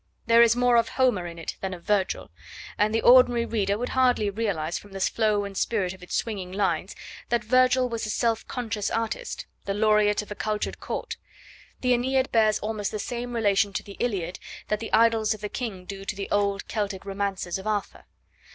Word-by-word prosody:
There 230 0 +6
is 235 0 +6
more 245 -1 +4
of 230 - +2
Homer 245 -9 +1
in 170 0 -9
it 165 - -6
than 190 -1 -3
of 170 - -14
Virgil, 200 -1 0 0.4
and 210 +1 +2
the 225 - 0
ordinary 245 -1 +6
reader 205 -3 0
would 245 +3 -3
hardly 250 -5 +2
realise 195 -7 -2
from 205 -1 -16
the 195 - -5
flow 210 +1 +1
and 200 -1 -7
spirit 190 -4 0
of 190 - -15
its 180 - -5
swinging 195 -6 -3
lines 195 +1 -1 0.3
that 235 -1 +1
Virgil 255 +2 +4
was 230 -2 -3
a - - -5
self 225 0 0
conscious 225 -4 -3
artist, 475 - -3 0.2
the 195 - -2
Laureate 210 -1 +3
of 210 - -15
a - - -1
cultured 210 0 -3
Court. - - -4 0.6
The 250 -1 +3
AEneid 260 +2 +1
bears 215 -2 +4
almost 210 -1 -2
the 215 - -4
same 240 +3 -4
relation 205 -2 +2
to - - -3
the 200 -1 -11
Iliad 190 -7 -2 0.3
that 210 - 0
the 225 - -5
Idylls 225 -1 +3
of 210 - -14
the 210 - -4
King 205 -8 -5
do 195 +1 -7
to 200 - -3
the 195 0 -6
old 200 -1 0
Celtic 200 -3 -3
romances 195 -2 -2
of 190 - -7
Arthur. 210 -2 -3
215 Hz, 205 wpm, -26 LUFS, 200-235 Hz, 0.6 s, There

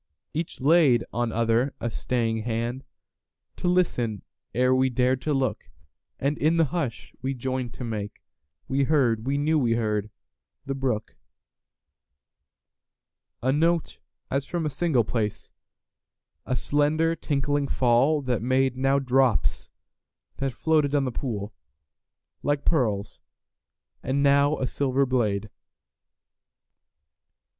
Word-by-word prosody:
Each 160 +2 -4
laid 140 -4 +4
on 120 -1 0
other 115 +4 +1
a 120 0 -2
staying 115 -1 -1
handTo 120 +9 -7
listen 125 - +1 0.3
ere 125 +1 +3
we 130 0 +3
dared 125 +1 +1
to 150 - -1
look, 135 -4 -1 0.5
And 140 +2 -1
in 160 +3 +2
the 165 - +4
hush 135 -10 -3
we 135 +1 -2
joined 130 -1 -3
to - - -6
makeWe 105 - -5
heard—we 135 -3 +2
knew 155 +2 +2
we 120 -4 +2
heard—the 110 +4 -4
brook.A 130 -5 -2 2.4
note 165 +3 +1 0.3
as 140 0 -1
from 170 -2 -2
a 150 - -1
single 150 -7 +2
place,A 110 +3 -7
slender 150 +5 +1
tinkling 145 -2 -1
fall 135 +5 +2
that 125 -4 -1
madeNow 135 +2 +1
drops 125 -6 +2 0.7
that 135 -1 -1
floated 150 +2 +1
on 140 -1 +2
the 130 - -2
poolLike 100 - -6
pearls, 110 -10 0 0.8
and 140 +2 0
now 140 +1 +4
a 130 - -1
silver 135 +1 +1
blade. 110 -5 0
130 Hz, 105 wpm, -26 LUFS, 115-145 Hz, 2.4 s, laid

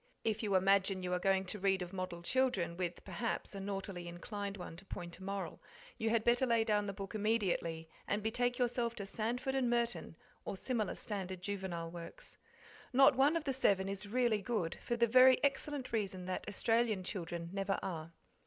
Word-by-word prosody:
If 220 -1 0
you 205 -3 +1
imagine 190 0 +3
you 180 0 -1
are 180 - +1
going 190 +1 +2
to 205 +3 -5
read 190 -1 +2
of 180 +1 -9
model 180 -2 -4
children, 210 -7 +1
with 175 -1 -3
perhaps; 235 -2 -3
a 200 - -5
naughtily 195 -2 -4
inclined 200 +3 -5
one 175 -2 -7
to 190 - -13
point 175 -2 -7
a - - -10
moral, 195 -3 -4 0.4
you 225 - +1
had 225 -1 +2
better 240 +3 +3
lay 230 -2 +4
down 210 -2 +1
the - - -1
book 195 -1 -7
immediately 195 -7 0 0.2
and 205 +1 0
betake 245 +2 +1
yourself 240 -1 0
to 200 - -5
'Sandford 240 +6 -2
and 260 -3 +2
Merton' 235 -7 0 0.3
or 195 - -4
similar 220 -3 -1
standard 190 -3 -4
juvenile 185 -5 -3
works. 170 -1 -8 0.5
Not 270 +1 +7
one 280 +5 +4
of 330 - 0
the 275 -3 0
seven 195 -7 +3
is 195 +1 -3
really 235 -1 +2
good, 195 -6 -1
for 240 - 0
the 235 - +5
very 255 +2 +7
excellent 280 -1 0
reason 195 -4 -1
that 185 0 -3
Australian 225 -1 +2
children 170 -3 -4
never 195 0 0
are. 165 -3 -4
200 Hz, 190 wpm, -35 LUFS, 185-235 Hz, 0.5 s, Not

